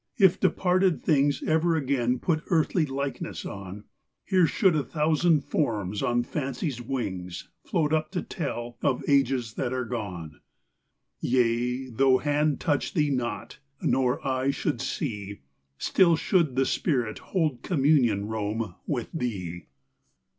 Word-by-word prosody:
If 190 -5 +5
departed 185 -1 +2
things 145 -2 +2
Ever 160 +1 +2
again 130 -4 +1
put 155 +4 0
earthly 165 -2 +2
likeness 140 +1 -4
on, 100 +1 -7 0.4
Here 185 -4 +4
should 190 -2 +3
a 150 - +2
thousand 155 +1 +2
forms 105 -9 -1
on 120 0 +1
fancy's 135 -1 -3
wings 100 -9 -4 0.2
Float 155 -2 0
up 155 0 +1
to 180 - -1
tell 120 -7 -5
of 135 -3 0
ages 135 -5 +2
that 125 - -1
are 130 -1 -2
gone: 90 -10 -6 0.8
Yea 125 +1 +1
though 130 +2 +4
hand 145 +1 +1
touch 145 +1 -1
thee 150 -3 +2
not, 120 -5 -3 0.2
nor 130 0 +1
eye 130 0 0
should 140 -2 -1
see, 105 - -4 0.4
Still 170 -3 +4
should 160 -5 +1
the 135 0 +3
spirit 125 - 0
hold 155 -9 -1
communion, 135 - +2
Rome, 110 0 -3
with 125 -6 -2
thee 95 - -4
135 Hz, 130 wpm, -27 LUFS, 120-155 Hz, 0.8 s, If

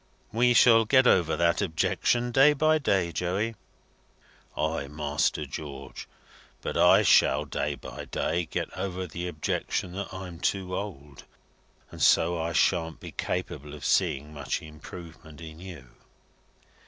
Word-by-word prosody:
"We 120 +2 +3
shall 115 -1 +7
got 130 +3 +4
over 85 -9 +3
that 85 +2 +2
objection 120 +7 0
day 135 +4 +6
by 155 +2 +2
day, 95 - +1
Joey." 95 +7 -2 1.0
"Ay, 80 -2 -1
Master 75 +1 -1
George; 70 -1 -8 0.6
but - - -4
I - - +6
shall - - +4
day - - -2
by - - -9
day 85 -1 -2
get - - -4
over 95 -1 -4
the 90 +1 -5
objection 90 +2 -2
that 100 +2 -5
I'm 95 -3 -8
too 90 0 -1
old, 75 -10 -7 0.7
and - - -9
so 85 0 +4
I 85 +1 -2
shan't 80 -1 +1
be - - -9
capable 75 +1 -4
of 75 - -9
seeing 75 +3 +1
much 75 +1 -4
improvement 80 0 -11
in 80 -1 -10
you." 85 -8 -10
85 Hz, 140 wpm, -27 LUFS, 75-100 Hz, 1.0 s, shall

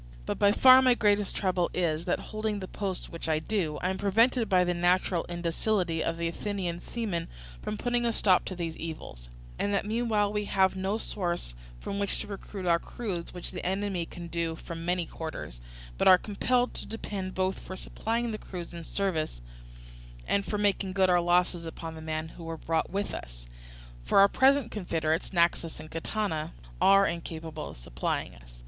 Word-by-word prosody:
But - - -3
by 200 0 +6
far 260 +4 +8
my 255 -2 +5
greatest 205 -3 +2
trouble 185 -3 +1
is, 165 -2 0
that 175 - +1
holding 215 -1 -1
the 185 - -6
post 195 -2 -4
which 165 -1 -5
I 155 - +3
do, 160 -2 -1
I 185 - +2
am 190 - -4
prevented 225 +3 +3
by 185 -2 +5
the 180 0 +1
natural 175 0 +2
indocility 175 0 0
of 165 - -1
the 170 0 -1
Athenian 180 -1 -3
seaman 200 -6 -3 0.3
from 210 - -3
putting 240 +2 0
a 235 - +2
stop 190 -4 +4
to 185 - -4
these 165 -2 -3
evils; - - -7 0.3
and 205 - 0
that 200 - 0
meanwhile 215 -2 +1
we 210 0 -1
have 190 -1 +3
no 190 +3 -1
source 175 - -2 0.3
from 200 - -4
which 200 -1 0
to - - -2
recruit 200 -1 -6
our 170 -1 +4
crews, 190 -8 -5
which 180 -1 -6
the - - -6
enemy 190 -2 -1
can 175 - -8
do 165 -1 -2
from 165 0 -7
many 175 0 0
quarters, 155 - -7 0.4
but - - +3
are 185 - +10
compelled 245 +6 0
to - - -4
depend 200 -4 -5
both 190 0 0
for 185 - -8
supplying 230 +4 -2
the 215 - -4
crews 175 -2 -7
in 170 -1 -7
service 160 - -1 0.9
and 200 0 +1
for 210 - -1
making 200 -2 +1
good 190 -1 +4
our 175 0 +5
losses 175 0 +2
upon 165 0 -6
the 160 - -9
men 155 0 -3
whom 165 0 -10
we 165 - -3
brought 160 0 -1
with 200 +2 -2
us. - - -8 0.6
For - - +1
our 195 0 +9
present 265 +2 +3
confederates, 165 -4 -1
Naxos 170 -3 +1
and 155 0 -10
Catana, 165 -2 -2 0.3
are 195 0 +7
incapable 165 -2 -4
of - - -10
supplying - - -3
us. - - -15
185 Hz, 190 wpm, -29 LUFS, 165-205 Hz, 0.9 s, are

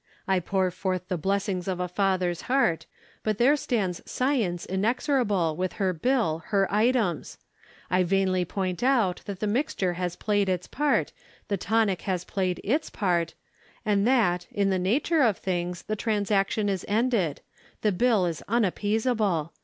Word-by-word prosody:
I 190 -1 +3
pour 185 +1 0
forth 185 0 -3
the 180 - 0
blessings 195 0 -1
of 185 -2 -2
a 180 - -1
father's 180 -2 0
heart; 250 -11 +2 0.3
but 215 -2 -1
there 260 +6 +5
stands 205 - -1
Science 235 -10 -1
inexorable, 205 - +1
with 185 +2 -2
her 190 -3 0
bill, 195 -4 0
her 195 -2 +2
items. 215 - +1 0.5
I 180 - +3
vainly 185 0 +2
point 185 0 -3
out 240 -8 +2
that 200 -2 -6
the - - +1
mixture 205 -5 0
has 180 0 -3
played 205 -2 0
its 180 -1 -1
part, 295 0 0 0.4
the 200 - 0
tonic 200 -2 +1
has 180 -2 0
played 185 -2 -2
its 290 +9 0
part; 175 -5 0 0.5
and 205 0 +2
that, 195 -9 +2
in 200 -1 +1
the 190 - +1
nature 275 - +2
of 220 -8 +3
things, 180 -1 -3
the 215 - -2
transaction 205 -1 0
is 195 -3 -1
ended. 215 - +1 0.4
The 210 - +3
bill 215 -1 +2
is 165 -3 -3
unappeasable. 210 - 0
195 Hz, 155 wpm, -26 LUFS, 180-220 Hz, 0.5 s, there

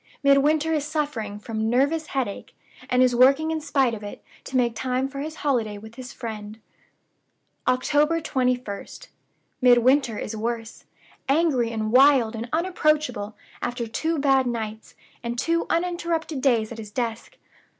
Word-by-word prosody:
Midwinter 295 +3 +3
is 300 -2 0
suffering 290 -9 -3
from 220 +1 -3
nervous 285 +6 +1
headache; 255 -9 -4 0.3
and 250 0 +4
is 250 -1 +3
working 275 +6 +4
in 320 -1 -2
spite 275 -5 +1
of 215 - -6
it, 205 -1 -9 0.2
to 260 - -2
make 240 -2 +2
time 255 +2 -1
for 275 0 -8
his 310 +2 -5
holiday 225 -7 0
with 220 +2 -12
his 255 +1 -9
friend." 215 -2 -7 1.1
"October 295 +5 +2
21st. 250 - -3 0.5
Midwinter 250 -1 +4
is 220 - -5
worse. 225 +1 -4 0.4
Angry 275 -6 +2
and 215 -1 -2
wild 255 -3 +5
and 230 +2 -5
unapproachable, 305 - 0 0.3
after 240 -1 -2
two 320 +8 -2
bad 270 -2 +3
nights, 220 -2 -5 0.3
and 235 0 -4
two 335 +6 0
uninterrupted 335 -4 -1
days 235 -5 +2
at 230 - -7
his 215 -2 -8
desk. 230 0 -4
255 Hz, 145 wpm, -24 LUFS, 225-295 Hz, 1.1 s, wild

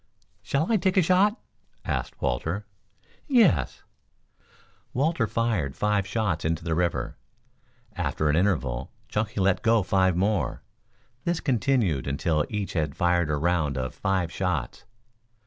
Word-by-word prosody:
"Shall 155 +9 0
I 225 - +4
take 190 0 0
a 185 - +6
shot?" 190 +6 +3 0.5
asked - - -3
Walter. 80 - -1 0.6
"Yes." 215 - +3 1.1
Walter 135 -3 +1
fired 105 - -1
five 105 -2 +1
shots 100 -5 -1
into 80 +1 -1
the 80 -1 -1
river. 85 +1 -1 0.8
After 75 - -1
an 75 - +3
interval 75 -10 0 0.2
Chunky 105 -1 -2
let 95 -1 +2
go 115 -2 +3
five 95 -2 +2
more. 100 -1 0 0.6
This 170 -1 0
continued 115 - +1
until 75 +2 0
each 105 -2 -3
had 75 -4 -1
fired 85 -2 +2
a 75 - +1
round 80 -3 0
of 65 0 -3
five 95 -4 -1
shots. 90 -4 -2
95 Hz, 130 wpm, -26 LUFS, 80-115 Hz, 1.1 s, a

